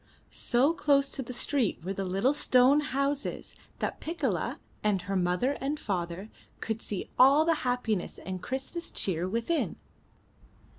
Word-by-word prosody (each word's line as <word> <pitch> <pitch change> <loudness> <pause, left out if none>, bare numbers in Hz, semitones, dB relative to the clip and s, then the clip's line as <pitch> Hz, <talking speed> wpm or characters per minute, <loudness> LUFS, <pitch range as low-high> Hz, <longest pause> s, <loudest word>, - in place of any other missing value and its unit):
So 265 +7 +2
close 280 -4 +2
to - - -3
the 250 - -6
street 250 - 0
were 190 +3 -2
the 195 - -3
little 195 +9 +2
stone 260 0 +4
houses, 280 0 -2 0.2
that - - -3
Piccola 335 +2 -2 0.3
and 200 -4 +1
her 195 +1 -3
mother 180 +8 +1
and 290 +3 -1
father 180 +1 -3 0.3
could 225 0 -3
see 200 - -5
all 275 +5 +7
the 335 - +4
happiness 245 -6 -1
and 185 -1 -6
Christmas 270 - -4
cheer 180 -1 -1
within. 235 - 0
250 Hz, 145 wpm, -29 LUFS, 195-280 Hz, 0.3 s, all